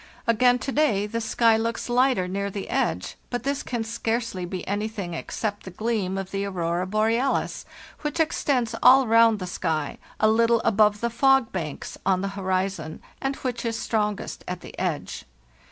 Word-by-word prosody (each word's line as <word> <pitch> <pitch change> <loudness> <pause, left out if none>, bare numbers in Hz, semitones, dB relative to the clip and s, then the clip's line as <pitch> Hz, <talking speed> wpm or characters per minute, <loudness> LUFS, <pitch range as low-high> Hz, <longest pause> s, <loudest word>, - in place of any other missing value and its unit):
Again 245 +2 +4
to 270 - -4
day 255 -9 +2
the 230 +2 -3
sky 225 0 +3
looks 230 +1 -2
light 255 +1 +3
er 180 -1 -1
near 200 +2 -2
the 200 0 -6
edge, - - -1
but 245 -1 -3
this 280 +1 -1
can 240 -3 -3
scarcely 225 -4 -2
be 180 0 -6
anything 205 -3 -3
ex - - -6
cept 205 -2 -2
the - - -9
gleam 195 -1 -2
of 195 -1 -5
the 195 0 -2
aurora 180 -2 -1
borealis, 225 +6 0 0.3
which 300 +2 -3
extends 275 -6 +1
all 260 +2 +7
round 230 -1 +5
the 185 - -5
sky, 160 -4 -2 0.2
a 215 - +4
little 230 +1 +4
above 210 -1 +3
the 235 0 0
fog 270 0 +3
banks 160 -6 -5
on 185 -1 +2
the 195 - -2
horizon, 190 -4 -2 0.2
and 270 0 -1
which 250 -3 -4
is 230 -1 -1
strongest 210 -3 -2
at 180 -1 -4
the - - -10
edge. 170 -6 -3
220 Hz, 180 wpm, -25 LUFS, 190-235 Hz, 0.3 s, all